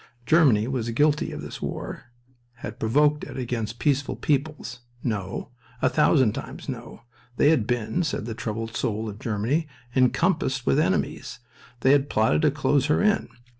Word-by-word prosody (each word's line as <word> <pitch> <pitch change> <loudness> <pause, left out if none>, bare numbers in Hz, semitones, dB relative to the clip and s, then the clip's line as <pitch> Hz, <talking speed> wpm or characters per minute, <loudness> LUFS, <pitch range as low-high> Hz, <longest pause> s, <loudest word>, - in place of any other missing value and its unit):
Germany 125 -7 +4
was 125 -3 -2
guilty 145 +5 +2
of - - -6
this - - -8
war, - - -5 0.6
had - - -7
provoked 145 +6 +2
it - - -7
against 120 -3 -3
peaceful 140 +2 0
peoples? 140 -4 -2 0.2
No! 100 -4 -3 0.3
A 130 - +3
thousand 135 -7 +3
times - - -7
no. - - -7 0.3
They 145 - +5
had 120 -10 +2
been, 120 +3 0
said 150 -9 -2
the 115 - -4
troubled 115 0 -4
soul 110 0 -1
of 105 0 -7
Germany, 115 +10 -1 0.3
encompassed 135 0 +2
with 70 - +3
enemies. - - -1 0.4
They 130 - +5
had 140 0 +3
plotted 110 +7 +2
to 155 - +4
close 145 -1 +1
her 150 - +2
in. 210 0 +2
130 Hz, 160 wpm, -25 LUFS, 115-150 Hz, 0.6 s, They